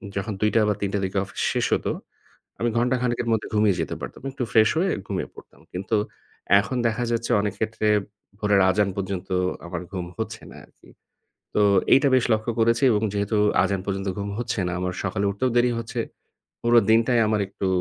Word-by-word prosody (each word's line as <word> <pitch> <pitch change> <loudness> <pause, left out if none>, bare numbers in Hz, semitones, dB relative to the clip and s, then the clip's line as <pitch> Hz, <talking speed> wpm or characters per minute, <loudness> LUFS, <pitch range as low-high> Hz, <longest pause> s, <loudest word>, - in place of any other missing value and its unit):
যখন 100 +2 -2
২ঃ০০ 105 +1 +3
বা - - +3
৩ঃ০০ 100 0 -1
-র - - -3
দিকে 95 +1 -3
অফিস 95 - -7
শেষ - - +1
হতো, - - 0 0.7
আমি 120 - +1
ঘন্টাখানেকের 125 0 0
মধ্যে 110 -1 0
ঘুমিয়ে 105 -2 +3
যেতে 80 - -3
পারতাম। - - -8
একটু 130 -1 -4
ফ্রেশ 110 -3 +5
হয়ে 185 +3 +2 0.2
ঘুমিয়ে 95 -2 -3
পড়তাম। - - -15
কিন্তু 100 +5 -2 0.6
এখন 125 +5 -2
দেখা 115 +2 -1
যাচ্ছে 115 0 -1
অনেক 105 -2 -2
ক্ষেত্রে 110 -1 -1 0.5
ভোরের 105 -2 +3
আজান 100 +1 +2
পর্যন্ত 95 -1 -4 0.4
আমার 85 0 -5
ঘুম 90 -3 -4
হচ্ছে - - -5
না - - -12
আরকি। - - -23 0.6
তো - - +2 0.3
এইটা 140 +2 +5
বেশ 130 - +3
লক্ষ্য 110 +2 -1
করেছি 115 +2 +3
এবং 105 -2 +1
যেহেতু 100 +1 0 0.3
আজান 100 -2 -1
পর্যন্ত 95 0 -3
ঘুম 100 0 -3
হচ্ছে 120 -3 -2
না, - - -2
আমার 90 0 -2
সকালে 100 +1 -1
উঠতেও 100 +6 0
দেরি 120 0 +4
হচ্ছে। 115 - -5 0.6
পুরো 120 0 +4
দিনটাই 115 +2 +4
আমার 105 -1 +1
একটু 95 - -3
105 Hz, 185 wpm, -24 LUFS, 100-115 Hz, 0.7 s, ফ্রেশ